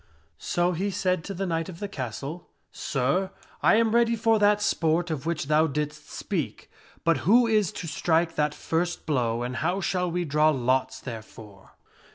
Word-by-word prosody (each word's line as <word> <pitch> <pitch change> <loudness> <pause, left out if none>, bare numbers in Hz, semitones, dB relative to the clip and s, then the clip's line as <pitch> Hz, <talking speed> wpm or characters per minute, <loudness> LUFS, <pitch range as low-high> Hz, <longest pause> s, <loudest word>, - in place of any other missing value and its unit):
So 175 +1 0
he 185 +4 -1
said 185 -3 0
to 200 - -5
the 195 +2 -2
knight 165 -2 -2
of 170 -2 -9
the 205 - -3
castle, 140 - -6
" - - -47
Sir, 145 +8 0 0.3
I - - +5
am 225 0 +3
ready 235 0 +3
for 225 0 +2
that 205 0 +4
sport 170 -3 +1
of 155 0 -4
which 165 -3 -1
thou 155 +2 +3
didst 150 0 -4
speak, 160 - -4 0.3
but 165 -3 +3
who 220 - +4
is 215 -5 +2
to 170 - -6
strike 165 +1 +1
that 150 0 0
first 175 +2 -2
blow 120 -5 0
and 125 +1 -4
how 175 +5 0
shall 180 -1 0
we 175 +1 -1
draw 150 +1 +3
lots 130 -2 0
therefor?" 110 -4 -10
165 Hz, 185 wpm, -26 LUFS, 145-190 Hz, 0.3 s, I